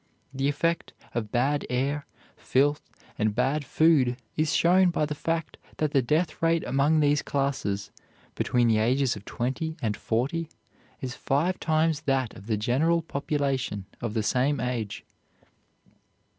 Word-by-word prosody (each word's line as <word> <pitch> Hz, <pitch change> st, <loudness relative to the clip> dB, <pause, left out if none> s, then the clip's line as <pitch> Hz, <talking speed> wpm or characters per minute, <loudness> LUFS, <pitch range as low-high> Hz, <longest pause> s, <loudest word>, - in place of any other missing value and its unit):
The 135 Hz, +1 st, 0 dB
effect 165 Hz, +3 st, -1 dB, 0.2 s
of 110 Hz, -3 st, -3 dB
bad 140 Hz, +4 st, +1 dB
air, 140 Hz, +4 st, -1 dB, 0.3 s
filth, 145 Hz, +3 st, +1 dB, 0.3 s
and 105 Hz, -1 st, +1 dB
bad 135 Hz, +4 st, +1 dB
food 140 Hz, -4 st, +3 dB, 0.2 s
is 155 Hz, -1 st, +1 dB
shown 180 Hz, +2 st, +5 dB
by 160 Hz, -3 st, 0 dB
the 150 Hz, -, -3 dB
fact 165 Hz, +2 st, -3 dB, 0.2 s
that 155 Hz, -2 st, 0 dB
the 140 Hz, -3 st, +3 dB
death 155 Hz, +8 st, 0 dB
rate 165 Hz, 0 st, +2 dB
among 145 Hz, +3 st, +2 dB
these 145 Hz, 0 st, +3 dB
classes, 120 Hz, -8 st, -2 dB, 0.4 s
between 120 Hz, -1 st, +1 dB
the 110 Hz, -1 st, +3 dB
ages 125 Hz, +3 st, +2 dB
of 105 Hz, -1 st, -10 dB
twenty 135 Hz, +7 st, -3 dB
and 110 Hz, -3 st, -1 dB
forty, 140 Hz, +11 st, -1 dB, 0.5 s
is 130 Hz, -1 st, -4 dB
five 150 Hz, +8 st, 0 dB
times 155 Hz, -1 st, +1 dB
that 130 Hz, -4 st, +1 dB
of 100 Hz, -, -12 dB
the 110 Hz, -2 st, +1 dB
general 155 Hz, +10 st, +2 dB
population 140 Hz, -9 st, -2 dB, 0.2 s
of 115 Hz, -2 st, -3 dB
the 110 Hz, -, +1 dB
same 135 Hz, +5 st, +1 dB
age. 120 Hz, -3 st, -3 dB
140 Hz, 145 wpm, -27 LUFS, 120-155 Hz, 0.5 s, shown